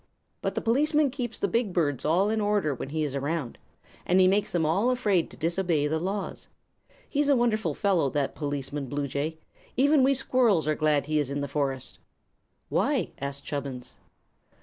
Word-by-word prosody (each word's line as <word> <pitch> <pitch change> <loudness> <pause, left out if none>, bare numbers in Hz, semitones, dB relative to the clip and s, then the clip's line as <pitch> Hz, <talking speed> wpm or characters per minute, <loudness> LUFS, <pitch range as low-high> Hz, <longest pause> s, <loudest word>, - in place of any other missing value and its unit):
But - - -2
the - - -1
policeman 290 +4 +2
keeps 245 -4 -4
the - - 0
big 210 0 0
birds 145 -7 0
all 185 +7 +3
in 220 -1 0
order 205 -7 +1
when 130 - -6
he 155 +1 -1
is 145 -3 -2
around, 140 -1 -3 0.4
and 180 +2 +3
he 185 - +6
makes 200 +2 +2
them 170 -3 +1
all 190 +10 +2
afraid 210 -9 +1
to - - -13
disobey 170 -2 0
the 160 +2 0
laws. 195 +4 -4 0.6
He's 290 0 0
a 280 - +6
wonderful 235 -3 +1
fellow, 190 -9 +2
that 140 0 -1
Policeman 145 -1 -4
Bluejay, 140 +1 -2
and 160 - -8 0.4
even 285 +2 +5
we 270 +1 +4
squirrels 240 - +2
are 155 - +3
glad 150 -2 +1
he 155 +1 +1
is 145 -3 0
in 140 +1 -2
the 140 - -2
forest." 135 -2 -3 0.7
"Why?" - - +1
asked 140 0 -4
Chubbins. 135 -4 -5
165 Hz, 185 wpm, -27 LUFS, 145-215 Hz, 0.7 s, he